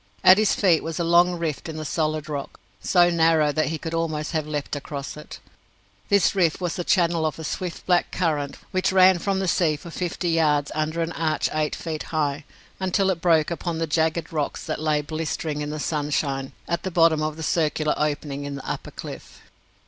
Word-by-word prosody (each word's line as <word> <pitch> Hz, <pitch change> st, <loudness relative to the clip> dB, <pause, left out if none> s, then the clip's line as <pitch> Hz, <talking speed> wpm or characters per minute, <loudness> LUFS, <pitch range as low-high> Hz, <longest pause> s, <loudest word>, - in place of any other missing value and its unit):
At 185 Hz, +2 st, +8 dB
his 215 Hz, -, +3 dB
feet 175 Hz, -6 st, +3 dB
was 165 Hz, 0 st, -4 dB
a -, -, +1 dB
long 175 Hz, +1 st, +4 dB
rift 165 Hz, -1 st, -3 dB
in 155 Hz, -, -6 dB
the 155 Hz, -, -5 dB
solid 155 Hz, 0 st, -1 dB
rock, 145 Hz, -2 st, -5 dB, 0.2 s
so 175 Hz, -1 st, +4 dB
narrow 160 Hz, -3 st, +3 dB
that 155 Hz, +1 st, 0 dB
he 160 Hz, +1 st, -2 dB
could 160 Hz, +2 st, -6 dB
almost 155 Hz, -2 st, -2 dB
have 155 Hz, -2 st, -1 dB
leapt 150 Hz, -1 st, -3 dB
across 140 Hz, -1 st, -6 dB
it. 150 Hz, -, -10 dB, 0.7 s
This 200 Hz, -3 st, +4 dB
rift 175 Hz, -5 st, +2 dB
was 175 Hz, -2 st, -2 dB
the 175 Hz, -, -3 dB
channel 170 Hz, -3 st, +2 dB
of 155 Hz, -3 st, -1 dB
a 160 Hz, -, -7 dB
swift 175 Hz, +2 st, -4 dB
black 180 Hz, -1 st, +2 dB
current 150 Hz, -5 st, -1 dB
which 185 Hz, -1 st, +1 dB
ran 185 Hz, -1 st, +6 dB
from 195 Hz, +2 st, -1 dB
the 190 Hz, 0 st, -1 dB
sea 165 Hz, -3 st, +2 dB
for 155 Hz, +3 st, -10 dB
fifty 175 Hz, 0 st, -2 dB
yards 150 Hz, -3 st, +2 dB
under 155 Hz, +2 st, -1 dB
an 165 Hz, -, -3 dB
arch 160 Hz, -2 st, 0 dB
eight 155 Hz, -1 st, 0 dB
feet 160 Hz, -2 st, -5 dB
high, 145 Hz, -2 st, -1 dB, 0.3 s
until 190 Hz, +1 st, +1 dB
it 170 Hz, -3 st, -4 dB
broke 165 Hz, -2 st, +3 dB
upon 170 Hz, 0 st, -3 dB
the 165 Hz, -, 0 dB
jagged 160 Hz, +1 st, 0 dB
rocks 150 Hz, -2 st, -2 dB
that -, -, -3 dB
lay 155 Hz, -1 st, +1 dB
blistering 155 Hz, -1 st, -3 dB
in 145 Hz, -, -3 dB
the 155 Hz, 0 st, -4 dB
sunshine 145 Hz, -3 st, -1 dB
at 170 Hz, -1 st, -1 dB
the 190 Hz, -, -3 dB
bottom 165 Hz, -3 st, +4 dB
of 155 Hz, 0 st, -2 dB
the 160 Hz, -, -6 dB
circular 155 Hz, -1 st, +1 dB
opening 145 Hz, -1 st, -2 dB
in 140 Hz, 0 st, -5 dB
the 135 Hz, -, -8 dB
upper -, -, -4 dB
cliff. -, -, -9 dB
160 Hz, 210 wpm, -24 LUFS, 150-170 Hz, 0.7 s, At